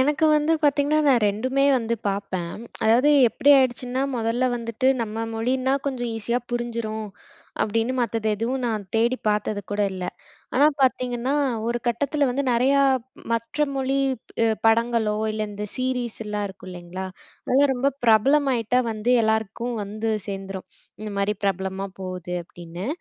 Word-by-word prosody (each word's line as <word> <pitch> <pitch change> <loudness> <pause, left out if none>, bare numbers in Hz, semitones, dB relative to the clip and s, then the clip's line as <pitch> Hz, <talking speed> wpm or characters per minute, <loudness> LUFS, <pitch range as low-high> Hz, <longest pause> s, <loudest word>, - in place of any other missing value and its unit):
எனக்கு 295 +4 +3
வந்து 300 +2 +2
பாத்தீங்கன்னா, 290 +1 +3
நான் 245 -5 +4
2மே 255 +7 0
வந்து 230 0 -1
பார்ப்பேன். 195 -4 -3 0.3
அதாவது 240 +7 +5 0.2
எப்படி 285 - +3
ஆயிடுச்சுன்னா, 255 0 0
மொதலல்ல 235 +2 0
வந்துட்டு 230 +2 -1
நம்ப 225 0 -3
மொழின்னா 255 +4 +1
கொஞ்சம் 245 -3 -3
ஈஸியா 235 +3 -1
புரிஞ்சிரும். 230 -3 -3 0.5
அப்டீன்னு 225 +3 0
மத்தது 225 -1 -2
எதுவும் 250 +5 -2
நான் 215 -3 -2
தேடி 235 +3 +3
பாத்தது 210 0 0
கூட 205 0 -1
இல்ல. 185 -1 -5 0.5
ஆனா, 280 +3 +6
பாத்தீங்கன்னா 255 0 +1 0.3
ஒரு 240 0 0
கட்டத்துல 280 +5 +1
வந்து 275 +3 -1
நெறைய 250 +3 +3 0.6
மற்ற 230 +6 -1
மொழி 270 0 0 0.7
படங்களோ, 225 -1 +2 0.2
இல்ல 215 0 -2
இந்த 205 0 -5
சீரிஸ்லாம் 235 -5 -2
இருக்கும் 190 -1 -12
இல்லங்களா, 180 +1 -7 0.4
அதெல்லாம் 275 +2 +3
ரொம்ப 260 +2 +1 0.2
பிரபலம் 270 +6 +4
ஆயிட்டா 235 0 +1
வந்து 220 +2 -1
எல்லாருக்கும் 220 +2 -1
வந்து 215 +2 -3 0.2
சேர்ந்துரும். 195 -1 -6 0.4
"இந்த 215 -1 -5
மாதிரி 200 +1 +1
பிரபலமா 190 0 -1
போகுது,"அப்டீன்னு. 180 -1 -6
230 Hz, 135 wpm, -24 LUFS, 210-255 Hz, 0.7 s, ஆனா